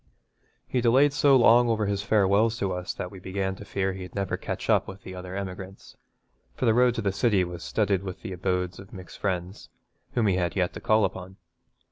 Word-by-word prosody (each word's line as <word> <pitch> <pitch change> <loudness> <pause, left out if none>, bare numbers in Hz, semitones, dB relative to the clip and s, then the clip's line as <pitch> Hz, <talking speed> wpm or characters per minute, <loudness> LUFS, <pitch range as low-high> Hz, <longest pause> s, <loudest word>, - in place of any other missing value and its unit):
He 125 - 0
delayed 130 +5 +4
so 145 -1 +5
long 120 -1 +6
over 110 -2 +1
his 100 0 -1
farewells 105 +1 +2
to 100 -5 -1
us 90 0 -4
that 90 - -5
we 95 - -10
began 95 +1 -3
to - - -9
fear 95 -1 -2
he'd 95 -1 -9
never 100 -2 -1
catch - - -5
up - - +3
with 95 0 -10
the 95 - -8
other 90 0 -7
emigrants, 95 0 -7 0.6
for - - -2
the 115 - +4
road 125 0 +4
to 115 - -3
the 100 - +1
city 100 -1 +2
was 85 -1 -6
studded 100 -4 0
with 95 -2 -7
the 95 - -5
abodes 90 0 -2
of 95 0 -13
Mick's 95 -2 -10
friends, 95 0 -4 0.4
whom 120 -3 +1
he 95 -3 +2
had 90 -2 -1
yet 90 -2 0
to - - -8
call 110 -1 +3
upon. 95 0 -6
95 Hz, 215 wpm, -26 LUFS, 95-110 Hz, 0.6 s, long